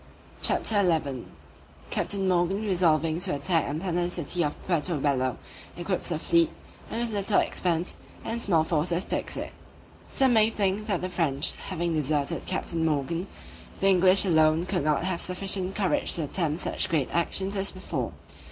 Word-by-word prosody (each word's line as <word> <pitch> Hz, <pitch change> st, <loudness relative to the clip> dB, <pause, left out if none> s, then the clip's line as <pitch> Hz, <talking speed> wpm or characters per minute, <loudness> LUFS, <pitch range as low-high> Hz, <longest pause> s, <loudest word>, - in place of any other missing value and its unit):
CHAPTER 210 Hz, -2 st, +2 dB
XI 150 Hz, -9 st, 0 dB, 0.7 s
_Captain 195 Hz, -1 st, -1 dB
Morgan 185 Hz, +3 st, +1 dB
resolving 165 Hz, -4 st, +2 dB
to 175 Hz, -, -1 dB
attack 160 Hz, +3 st, +1 dB
and 145 Hz, +2 st, -3 dB
plunder 175 Hz, -1 st, -1 dB
the -, -, -2 dB
city 175 Hz, 0 st, -1 dB
of 150 Hz, -, -2 dB
Puerto 170 Hz, -1 st, -1 dB
Bello, 130 Hz, -2 st, 0 dB, 0.4 s
equips 175 Hz, +1 st, -2 dB
a 170 Hz, -, 0 dB
fleet, 170 Hz, +1 st, +2 dB, 0.4 s
and 230 Hz, -, -3 dB
with 240 Hz, -1 st, -2 dB
little 200 Hz, 0 st, +2 dB
expense 175 Hz, -1 st, -1 dB, 0.3 s
and 230 Hz, +1 st, -3 dB
small 165 Hz, -7 st, +2 dB
forces 170 Hz, +3 st, -1 dB
takes -, -, -3 dB
it._ -, -, -5 dB, 0.6 s
SOME 265 Hz, -2 st, +3 dB
may 220 Hz, -1 st, +5 dB
think 205 Hz, -1 st, -1 dB
that 195 Hz, -5 st, 0 dB
the 185 Hz, -, -3 dB
French 150 Hz, -6 st, +1 dB
having 170 Hz, -2 st, -4 dB
deserted 150 Hz, -2 st, -1 dB
Captain 170 Hz, -3 st, -2 dB
Morgan, 160 Hz, +4 st, -1 dB, 0.5 s
the 195 Hz, -, +4 dB
English 185 Hz, +1 st, +7 dB
alone 160 Hz, -1 st, +3 dB
could 160 Hz, -, -1 dB
not 150 Hz, 0 st, +1 dB
have 185 Hz, -2 st, -2 dB
sufficient 190 Hz, +1 st, +1 dB
courage 195 Hz, -3 st, +1 dB
to 165 Hz, -, -1 dB
attempt 155 Hz, 0 st, -1 dB
such -, -, -1 dB
great 155 Hz, -6 st, 0 dB
actions 190 Hz, +3 st, 0 dB
as 195 Hz, 0 st, +1 dB
before. 185 Hz, 0 st, -4 dB
175 Hz, 165 wpm, -26 LUFS, 155-190 Hz, 0.7 s, English